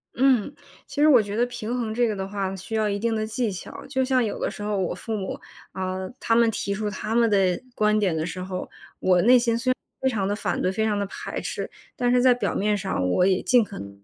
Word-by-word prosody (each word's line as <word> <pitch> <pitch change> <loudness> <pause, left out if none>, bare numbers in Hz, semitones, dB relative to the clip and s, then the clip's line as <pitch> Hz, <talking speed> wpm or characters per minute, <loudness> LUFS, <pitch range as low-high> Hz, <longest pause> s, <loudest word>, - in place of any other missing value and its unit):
嗯， 260 0 +3 0.3
其 290 - -3
实 305 - +6
我 255 -7 +7
觉 205 0 -5
得 240 +2 +3
平 240 -1 -4
衡 225 -3 -2
这 240 +1 +2
个 215 - -1
的 190 -1 -4
话， 195 -1 -3
需 190 +4 -6
要 215 -1 +1
一 200 - -1
定 230 +2 0
的 215 0 -1
技 225 0 -1
巧， 185 - -8
就 265 -1 0
像 255 -1 +2
有 215 - -3
的 - - -1
时 205 - -8
候 210 0 -1
我 185 -2 -1
父 225 - -4
母， 190 -3 -4 0.3
啊， 185 0 -3 0.2
他 230 - +1
们 235 -1 +5
提 200 -2 -2
出 210 +1 -2
他 210 +2 -4
们 235 -1 +4
的 190 -4 +2
观 215 0 +3
点 185 -5 +1
的 160 0 -1
时 180 +2 -5
候， 185 0 -5 0.3
我 180 -1 +3
内 250 +5 +7
心 235 -1 +1
虽 255 +2 -1
然 255 - +3 0.3
非 265 - +3
常 205 -5 -1
地 205 - 0
反 185 -4 -2
对、 185 - +1
非 220 +3 -1
常 210 -2 +1
地 200 - 0
排 195 - -6
斥， - - -4 0.3
但 245 -1 +1
是 250 0 +4
在 255 -1 +6
表 245 - -2
面 210 +1 +1
上， 190 - -1
我 180 - +3
也 190 -1 +2
尽 245 -3 +5
可 200 -1 -9
能 100 - -7
不 100 0 -17
发 - - -35
210 Hz, 295 characters per minute, -25 LUFS, 190-235 Hz, 0.3 s, 我